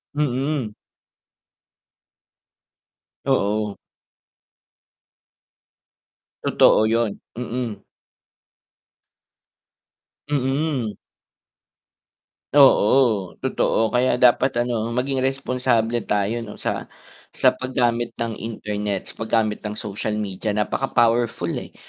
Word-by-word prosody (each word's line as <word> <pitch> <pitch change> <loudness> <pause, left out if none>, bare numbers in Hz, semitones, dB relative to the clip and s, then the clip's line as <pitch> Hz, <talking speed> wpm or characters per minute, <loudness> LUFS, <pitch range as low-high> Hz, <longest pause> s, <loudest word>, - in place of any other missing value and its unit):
Mm. 135 -4 -1 2.5
Oo. 105 0 0 2.6
Totoo 110 - +4
yun, 115 -1 +1 0.2
mm. 120 -2 -4 2.5
Mm. 135 -4 -1 1.6
Oo, 120 -7 +5
totoo, 110 -1 +1
kaya 125 +1 +2
dapat 125 0 +3
ano, 115 -2 -2
maging 130 +1 0
responsable 125 -3 0
tayo 105 +3 0
'no, 110 -3 -8
sa - - -3 0.5
sa - - +5
pag 130 0 -7
gamit 120 -1 +1
ng 115 -1 -4
internet, 105 -3 -4
sa - - -23
pag 115 - -5
gamit 105 -1 -3
ng 105 - -5
social 105 0 -4
media, 105 0 -3
napaka 105 +5 -1
powerful 115 -6 +2
eh, - - -6
115 Hz, 80 wpm, -22 LUFS, 105-130 Hz, 2.6 s, Oo